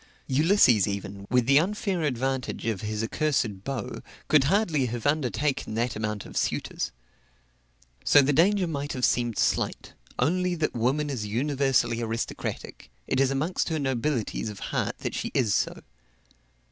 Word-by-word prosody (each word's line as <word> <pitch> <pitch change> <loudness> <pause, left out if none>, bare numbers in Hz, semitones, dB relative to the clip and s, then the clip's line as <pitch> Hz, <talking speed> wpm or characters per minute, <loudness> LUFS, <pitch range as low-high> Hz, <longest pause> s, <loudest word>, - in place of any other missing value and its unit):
Ulysses 135 - +4
even, 100 0 -5
with 125 -1 +3
the 140 +3 +6
unfair 195 0 -1
advantage 135 -2 -2
of 110 -5 -1
his 105 +1 -3
accursed 115 -6 -1
bow, 135 -5 -4 0.3
could 150 -3 +5
hardly 160 - +2
have 120 -1 -5
undertaken 145 -4 0
that 120 +1 -1
amount 105 -1 -3
of - - -11
suitors. - - -1 1.1
So 145 - +6
the 145 +2 +2
danger 185 +6 +4
might 145 -3 -3
have 125 -1 +1
seemed 120 -3 0
slight - - 0 0.2
only 180 +2 +1
that 155 -2 -1
woman 135 +5 0
is 110 -6 -3
universally 130 0 +1
aristocratic; 115 0 -4 0.2
it 130 - 0
is 135 -1 +4
amongst 150 +8 -1
her 160 - 0
nobilities 130 -5 -1
of 105 - -8
heart - - -1
that - - -3
she - - -3
is 115 -6 +2
so. - - -1
135 Hz, 150 wpm, -27 LUFS, 115-150 Hz, 1.1 s, the